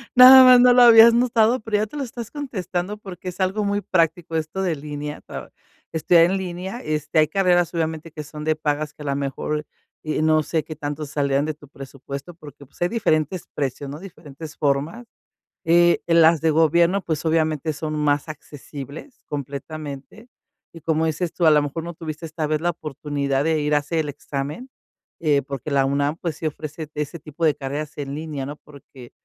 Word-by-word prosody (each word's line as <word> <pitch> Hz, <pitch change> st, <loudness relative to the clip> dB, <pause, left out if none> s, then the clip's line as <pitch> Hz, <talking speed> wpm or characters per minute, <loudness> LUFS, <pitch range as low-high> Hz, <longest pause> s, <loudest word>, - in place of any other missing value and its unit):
Nada 255 Hz, +1 st, +10 dB
más 250 Hz, -1 st, +8 dB
no 250 Hz, 0 st, +7 dB
lo 250 Hz, -, +6 dB
habías 230 Hz, -1 st, +9 dB
notado, 235 Hz, 0 st, +3 dB
pero 220 Hz, -1 st, -3 dB
ya 210 Hz, -, +1 dB
te 295 Hz, -, -9 dB
lo 285 Hz, -, -2 dB
estás 235 Hz, -2 st, -7 dB
contestando 195 Hz, -, -4 dB
porque 190 Hz, -3 st, -10 dB
es 180 Hz, -, -7 dB
algo 195 Hz, +3 st, 0 dB
muy 205 Hz, 0 st, 0 dB
práctico 165 Hz, -2 st, 0 dB
esto 160 Hz, +4 st, -3 dB
de 175 Hz, -5 st, -1 dB
línea. 150 Hz, 0 st, -6 dB
Tra -, -, -9 dB, 0.4 s
estudiar 165 Hz, +1 st, +4 dB
en 190 Hz, +3 st, 0 dB
línea, 190 Hz, +4 st, -5 dB
este, 155 Hz, 0 st, -1 dB
hay 155 Hz, -, +4 dB
carreras 175 Hz, 0 st, +2 dB
obviamente 160 Hz, -1 st, -3 dB
que 150 Hz, 0 st, -7 dB
son 150 Hz, +1 st, -9 dB
de 155 Hz, 0 st, +2 dB
pagas 150 Hz, -1 st, -2 dB
que -, -, -15 dB
a -, -, -9 dB
la 140 Hz, -1 st, -1 dB
mejor, 140 Hz, +2 st, -3 dB, 0.4 s
eh, 155 Hz, 0 st, -2 dB
no 155 Hz, 0 st, +3 dB
sé 155 Hz, +1 st, -2 dB
qué 155 Hz, +1 st, -9 dB
tanto 145 Hz, +1 st, -4 dB
salgan 140 Hz, -1 st, 0 dB
de 155 Hz, +1 st, -2 dB
tu 145 Hz, -1 st, -17 dB
presupuesto 140 Hz, +3 st, -9 dB
porque, 145 Hz, -3 st, -13 dB
pues, 140 Hz, -, -25 dB
hay 175 Hz, -, +3 dB
diferentes 180 Hz, -6 st, 0 dB
precios, 140 Hz, 0 st, -3 dB
¿no? 145 Hz, +3 st, -7 dB
Diferentes 160 Hz, -4 st, -11 dB
formas, 145 Hz, -, -1 dB, 0.6 s
eh, 170 Hz, +1 st, +4 dB
las 165 Hz, -1 st, +5 dB
de 160 Hz, -1 st, +2 dB
gobierno, 170 Hz, +4 st, +3 dB
pues, 160 Hz, -2 st, -3 dB
obviamente 160 Hz, -1 st, 0 dB
son 155 Hz, +1 st, -5 dB
más 145 Hz, 0 st, 0 dB
accesibles 150 Hz, -, -10 dB
completamente, 145 Hz, -, -7 dB, 0.4 s
y 165 Hz, -, -12 dB
como 160 Hz, +1 st, +1 dB
dices 160 Hz, +2 st, -2 dB
tú, 170 Hz, -, 0 dB
a -, -, +7 dB
la 150 Hz, -1 st, +5 dB
mejor 145 Hz, +3 st, -4 dB
no 170 Hz, 0 st, -7 dB
tuviste 160 Hz, 0 st, -7 dB
esta 155 Hz, 0 st, -3 dB
vez 155 Hz, 0 st, -1 dB
la 175 Hz, -, 0 dB
oportunidad 145 Hz, -3 st, -3 dB
de 160 Hz, -1 st, +1 dB
ir 150 Hz, 0 st, +1 dB
a -, -, +5 dB
hacer 155 Hz, +3 st, -2 dB
el 150 Hz, -2 st, -2 dB
examen, 145 Hz, -, -6 dB, 0.5 s
eh, 150 Hz, -3 st, +2 dB
porque 140 Hz, +2 st, -6 dB
la 135 Hz, -1 st, +3 dB
UNAM, 140 Hz, +2 st, 0 dB
pues, 165 Hz, -4 st, -4 dB
sí 160 Hz, -, -4 dB
ofrece 155 Hz, 0 st, -6 dB
ese 150 Hz, +2 st, -4 dB
tipo 155 Hz, +2 st, -6 dB
de 155 Hz, -2 st, +4 dB
carreras 145 Hz, +2 st, -5 dB
en 140 Hz, -1 st, -4 dB
línea, 150 Hz, -3 st, -5 dB
¿no? 145 Hz, -, -6 dB
Porque, 140 Hz, -4 st, -15 dB
155 Hz, 200 wpm, -22 LUFS, 145-175 Hz, 0.6 s, Nada